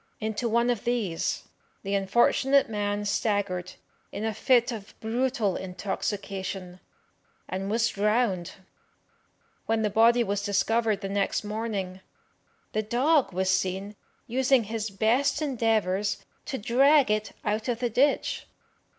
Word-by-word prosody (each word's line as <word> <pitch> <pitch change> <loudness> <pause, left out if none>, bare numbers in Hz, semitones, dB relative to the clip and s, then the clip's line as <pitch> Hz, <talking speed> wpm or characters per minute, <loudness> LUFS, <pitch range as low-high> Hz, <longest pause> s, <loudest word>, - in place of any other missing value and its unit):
Into 220 +2 -2
one 235 +2 +2
of 235 -4 -3
these 225 -9 -1 0.4
the 195 0 -3
unfortunate 240 +7 +3
man 205 -1 -2
staggered 200 -3 -1 0.4
in 215 - -4
a 220 - -1
fit 245 +3 +3
of 210 -4 -9
brutal 230 -3 0
intoxication, 190 -1 -4 0.7
and 190 +1 -3
was 225 +2 +2
drowned. 210 -4 0 1.1
When 225 0 +1
the 210 - 0
body 235 +3 +5
was 205 -2 -1
discovered 210 +1 +1
the 195 - -4
next 200 +1 0
morning, 210 -3 -3 0.7
the 215 - 0
dog 250 +3 +2
was 190 +1 0
seen 190 +2 -1 0.3
using 260 +1 +2
his 220 0 -3
best 230 +9 +1
endeavours 220 - 0 0.2
to 275 - -3
drag 265 +4 +4
it 215 0 -1
out 215 +2 -1
of 240 -2 0
the 245 0 -1
ditch. 280 +6 +1
215 Hz, 125 wpm, -27 LUFS, 195-235 Hz, 1.1 s, body